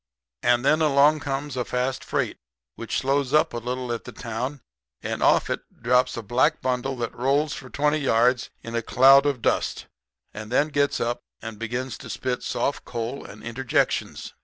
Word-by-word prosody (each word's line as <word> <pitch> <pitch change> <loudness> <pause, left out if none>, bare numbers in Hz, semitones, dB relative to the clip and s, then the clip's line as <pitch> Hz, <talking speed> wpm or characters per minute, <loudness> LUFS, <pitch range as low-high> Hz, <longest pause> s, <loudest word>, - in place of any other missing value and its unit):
"And 120 +1 +2
then 155 +3 +4
along 150 0 +4
comes 140 -1 -3
a 125 - -1
fast 125 +2 -2
freight - - -2 0.4
which 115 - -4
slows 135 +1 +1
up 155 - +3
a - - -3
little 125 +1 -3
at 115 - -5
the - - -8
town; 125 +4 -5 0.4
and - - -3
off - - +4
of - - -1
it - - -31
drops 125 +1 +2
a 115 - -4
black 125 +9 +2
bundle 130 +1 -1
that 120 -2 -3
rolls 140 +4 +1
for 130 - -8
twenty 150 +3 +1
yards 125 -2 +2
in 115 - -7
a 115 - 0
cloud 135 +4 +6
of 135 -5 -1
dust - - 0 0.5
and 105 +1 -8
then 145 +5 +2
gets 145 -1 +1
up 120 +1 -1 0.2
and 110 -1 -8
begins 120 +3 -4
to - - -10
spit 125 -1 -2
soft 140 - -2
coal 120 +3 -5
and 105 +1 -12
interjections. 120 +2 -1
130 Hz, 185 wpm, -25 LUFS, 120-140 Hz, 0.5 s, cloud